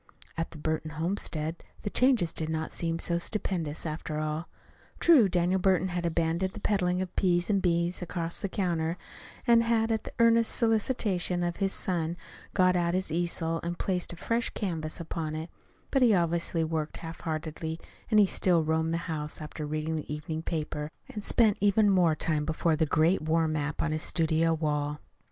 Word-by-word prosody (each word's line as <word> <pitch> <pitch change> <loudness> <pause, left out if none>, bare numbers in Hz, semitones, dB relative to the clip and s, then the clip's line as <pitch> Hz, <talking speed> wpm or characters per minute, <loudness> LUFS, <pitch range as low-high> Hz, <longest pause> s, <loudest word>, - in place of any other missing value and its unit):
At 165 0 -2
the 165 - -11
Burton 155 +1 -2
homestead 165 -2 -3 0.2
the 205 - -3
changes 250 -10 +3
did 160 -1 -3
not 160 0 -2
seem 165 -1 -1
so 170 0 -1
stupendous, 170 -6 -2
after 155 -1 -4
all. 155 +2 -3 0.5
True, 280 - +6
Daniel 180 +1 +2
Burton 185 -1 +2
had 175 -1 -1
abandoned 170 +3 0
the - - -7
peddling 185 -3 +1
of 180 - -9
peas 175 +1 +2
and 200 -2 +2
beans 170 0 +1
across 170 -1 -3
the 200 - -3
counter, 170 -3 -1 0.5
and 235 -2 +6
had, 230 -1 +1
at 220 -1 0
the - - -9
earnest 230 0 +4
solicitation 215 -6 +1
of 175 0 -2
his 195 -1 0
son, 170 -3 -1 0.4
got 185 -1 +4
out 175 0 +1
his 185 -3 0
easel 165 0 0
and 170 +1 -4
placed 180 -2 -1
a - - -7
fresh 230 +7 -1
canvas 165 -5 -3
upon 160 -2 -4
it; 160 +2 -5 0.4
but 270 - +2
he 235 -4 +6
obviously 170 -1 +1
worked 160 -1 -2
half 165 0 -8
heartedly, 160 0 -4 0.3
and 215 -2 +5
he 205 - +7
still 180 -3 +2
roamed 160 +1 0
the 170 - -3
house 150 -3 -4
after 150 0 -6
reading 155 +1 -2
the 150 - -6
evening 155 +1 -4
paper, 150 -2 -3 0.2
and 210 - -6
spent 220 -2 +3
even 205 +1 +4
more 175 -4 +4
time 155 -1 0
before 160 +1 +1
the 160 0 +1
great 160 +5 +3
war 160 +1 +2
map 150 -1 -2
on 165 - 0
his 155 0 -1
studio 165 -1 +2
wall. 150 -2 -1
170 Hz, 185 wpm, -29 LUFS, 160-185 Hz, 0.5 s, he